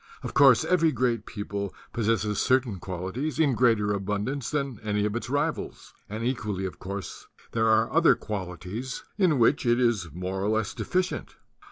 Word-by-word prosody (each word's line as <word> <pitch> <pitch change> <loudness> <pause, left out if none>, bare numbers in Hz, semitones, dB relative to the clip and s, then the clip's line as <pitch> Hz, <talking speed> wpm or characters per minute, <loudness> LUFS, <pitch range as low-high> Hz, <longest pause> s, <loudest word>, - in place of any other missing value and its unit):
Of - - -5
course, 135 -4 +6
every 165 -3 +3
great 120 -4 0
people 100 -2 -4 0.2
pos 115 -3 -1
sesses 105 -2 +1
certain 125 -7 +2
qualities 95 - -4
in 150 -4 +3
greater 115 -4 +3
abundance 105 +6 -2
than 140 -6 -2
any 105 -1 0
of 105 +1 -1
its 120 - -4
rivals; 145 +3 -2 0.2
and 110 +2 -4
equally 105 -6 -2
of 95 - -6
course 100 0 -6 0.2
there 115 -1 +1
are 110 +1 +3
other 165 +1 +6
qualities 100 +5 -5 0.2
in 175 -7 +4
which 125 +4 +3
it 120 -1 +3
is 115 -9 +1
more 95 +3 -4
or 100 - +1
less 110 -2 0
de - - -5
ficient. 185 0 -1
115 Hz, 175 wpm, -27 LUFS, 100-130 Hz, 0.2 s, course